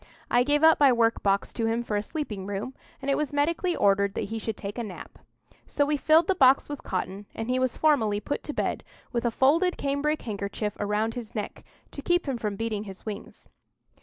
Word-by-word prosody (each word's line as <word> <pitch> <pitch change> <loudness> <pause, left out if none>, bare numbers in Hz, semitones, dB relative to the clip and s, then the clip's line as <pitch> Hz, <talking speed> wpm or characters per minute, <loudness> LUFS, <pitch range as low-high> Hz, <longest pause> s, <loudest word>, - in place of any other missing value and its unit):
I 245 - +5
gave 290 +4 +2
up 320 0 +7
my 280 -2 +7
work 230 -1 +2
box 200 0 +1
to 225 -1 -1
him 230 +1 0
for 215 - -3
a 205 - +1
sleeping 210 - -5
room, 205 +6 -4 0.3
and 280 - 0
it - - +2
was 300 -2 -1
medically 335 +5 +1
ordered 200 0 +2
that - - -3
he 225 - -2
should 220 0 -4
take 205 +4 -6
a - - -2
nap. 200 -5 -9 0.5
So 285 - +1
we 295 +1 +1
filled 315 +3 +4
the 385 - +2
box 270 -6 +5
with 290 -2 -6
cotton, 190 +2 -4
and 225 +2 -3
he 255 - +1
was 255 -1 0
formally 225 -10 +3
put 285 - -3
to 295 - -4
bed, - - -2 0.3
with 235 -1 -1
a - - +4
folded 315 +10 +3
cambric 285 +2 -1
handkerchief 205 -1 -3
round 210 +2 0
his 240 -3 -8
neck, 210 - -5 0.3
to 285 - -7
keep 350 +2 +1
him 260 -3 -2
from 210 -2 -2
beating 215 -1 -3
his 195 -2 -10
wings. 215 -2 -8
235 Hz, 220 wpm, -27 LUFS, 210-290 Hz, 0.5 s, up